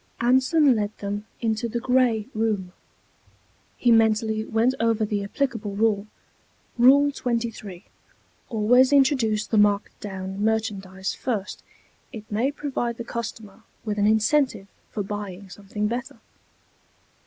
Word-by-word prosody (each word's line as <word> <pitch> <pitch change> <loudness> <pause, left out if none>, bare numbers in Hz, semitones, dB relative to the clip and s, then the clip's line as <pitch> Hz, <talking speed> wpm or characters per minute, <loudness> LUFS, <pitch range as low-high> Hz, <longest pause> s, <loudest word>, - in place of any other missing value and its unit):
Anson 260 +3 +4
led 210 -1 -2
them 205 +1 -5
into 225 0 -1
the 235 - -2
Gray 250 -3 +2
Room. 210 -5 -1 1.0
He 240 - +3
mentally 220 -1 +3
went 225 +4 +1
over 225 -1 +1
the 205 -1 -2
applicable 220 -2 -3
rule: 210 -1 +1 0.7
_Rule 280 +3 +5
23; 230 -6 -4 0.6
Always 245 +4 +4
introduce 255 -6 +3
the 220 - +1
marked 205 -1 +2
down 190 0 -5
merchandise 200 -4 -2
first. 215 -6 -4 0.5
It 220 -4 -8
may 235 +7 +1
provide 260 -5 -3
the 235 - -5
customer 225 -3 -7 0.2
with 210 -1 -2
an 205 - +3
incentive 220 +1 +2 0.2
for 205 - -3
buying 200 -2 -7
something 205 +2 -5
better. 250 +5 -3
220 Hz, 120 wpm, -24 LUFS, 205-245 Hz, 1.0 s, Rule